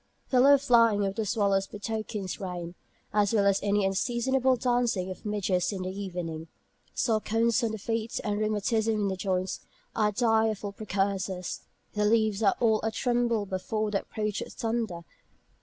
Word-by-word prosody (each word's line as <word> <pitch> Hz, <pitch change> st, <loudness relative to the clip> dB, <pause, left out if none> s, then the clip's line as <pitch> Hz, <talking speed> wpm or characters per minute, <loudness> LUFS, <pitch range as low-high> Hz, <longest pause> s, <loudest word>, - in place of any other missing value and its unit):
The 255 Hz, -, +4 dB
low 280 Hz, +2 st, +7 dB
flying 230 Hz, -6 st, +4 dB
of 195 Hz, -, -1 dB
the 215 Hz, 0 st, -2 dB
swallows 195 Hz, -2 st, +1 dB
betokens 210 Hz, -2 st, -4 dB
rain, 175 Hz, -3 st, -5 dB, 0.4 s
as 205 Hz, 0 st, +2 dB
well 200 Hz, -2 st, +3 dB
as 200 Hz, -1 st, +3 dB
any 205 Hz, 0 st, +1 dB
unseasonable 245 Hz, +6 st, +1 dB
dancing 240 Hz, -6 st, 0 dB
of 185 Hz, -, -8 dB
midges 190 Hz, -3 st, 0 dB
in 190 Hz, -2 st, -4 dB
the 185 Hz, -, -3 dB
evening. 175 Hz, -5 st, -5 dB, 0.5 s
Sore 220 Hz, -3 st, +1 dB
corns 230 Hz, +3 st, +1 dB
on 225 Hz, -, +1 dB
the 220 Hz, -, -4 dB
feet, 225 Hz, +2 st, -2 dB
and 205 Hz, -1 st, -1 dB
rheumatism 215 Hz, +1 st, +1 dB
in 205 Hz, -1 st, 0 dB
the 190 Hz, -, -2 dB
joints, 185 Hz, -1 st, -2 dB, 0.4 s
are 210 Hz, -1 st, +2 dB
direful 220 Hz, -2 st, +1 dB
precursors. 195 Hz, -3 st, -2 dB, 0.3 s
The 210 Hz, 0 st, +1 dB
leaves 220 Hz, -1 st, +2 dB
are 200 Hz, -3 st, +4 dB
all 220 Hz, -3 st, +3 dB
a 220 Hz, -, 0 dB
tremble 235 Hz, -2 st, 0 dB
before 210 Hz, +3 st, -2 dB
the 200 Hz, -, 0 dB
approach 210 Hz, -1 st, -3 dB
of -, -, -7 dB
thunder. 225 Hz, -6 st, -2 dB
210 Hz, 165 wpm, -28 LUFS, 195-225 Hz, 0.5 s, low